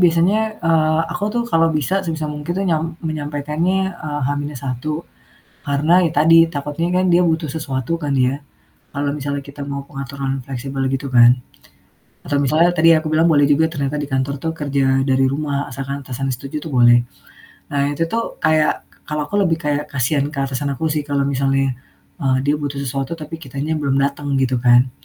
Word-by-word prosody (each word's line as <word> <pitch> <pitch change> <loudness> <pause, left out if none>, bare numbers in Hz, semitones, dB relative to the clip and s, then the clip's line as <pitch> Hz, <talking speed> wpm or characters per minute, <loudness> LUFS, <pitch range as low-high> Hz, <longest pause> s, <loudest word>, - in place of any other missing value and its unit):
biasanya, 190 +6 +2
eee, 155 -1 +3
aku 205 - -3
tuh 240 - +1
kalau 165 0 +4
bisa 155 +5 0
sebisa 160 -3 -3
mungkin 150 +3 -4
nyam 165 -1 -1
menyampaikannya, 155 +5 -1
eee, 150 -3 -5
H-1, 145 +1 -3 0.6
karena 150 +6 +3
ya 160 - -1
tadi 165 +2 +6
takutnya 150 +3 -3
kan - - +1
dia 175 - +5
butuh 160 -2 +1
sesuatu 140 -1 -2
kan 145 -3 -3
dia 130 +2 +1 0.5
kalau 140 0 -1
misalnya 140 -1 -3
kita 140 0 -11
mau 140 0 -4
pengaturan 135 -1 -4
fleksibel 135 0 -4
gitu 135 +1 -2
kan. 120 +1 +6 0.9
Atau 145 - 0
misalnya 155 +5 +3
tadi 165 +1 +6
yang 155 - +3
aku 155 - -3
bilang 160 +2 +4
boleh 145 -2 +5
juga 150 +2 +4
ternyata 140 -1 -2
di 145 - -3
kantor 135 +1 0
tuh 160 - -1
kerja 140 -3 -1 0.2
dari 135 -1 +3
rumah 140 +1 -1
asalkan 140 +2 -5
atasan 135 +1 -3
setuju 140 +4 -6
tuh 155 - -6
boleh. 120 0 +7 0.7
Nah, 140 0 +1
itu 145 +3 0
tuh 230 +5 -3
kayak 155 -1 +2 0.2
kalau 150 0 -1
aku 205 - -2
lebih 165 -3 +1
kayak 150 -2 -1
kasihan 140 +2 +1
ke 140 - -7
atasan 135 +1 -2
aku 160 - -2
sih 150 -1 -1
kalau 140 -1 0
misalnya, 135 -1 +1 0.5
eee, 130 -1 +2
dia 145 - +3
butuh 145 -1 -4
sesuatu 135 +1 -3
tapi 155 +1 -7
kitanya 140 +4 -3
belum 140 -3 0
dateng 140 +1 -1
gitu 130 -1 +1
kan. 125 +1 +5
145 Hz, 180 wpm, -19 LUFS, 135-160 Hz, 0.9 s, boleh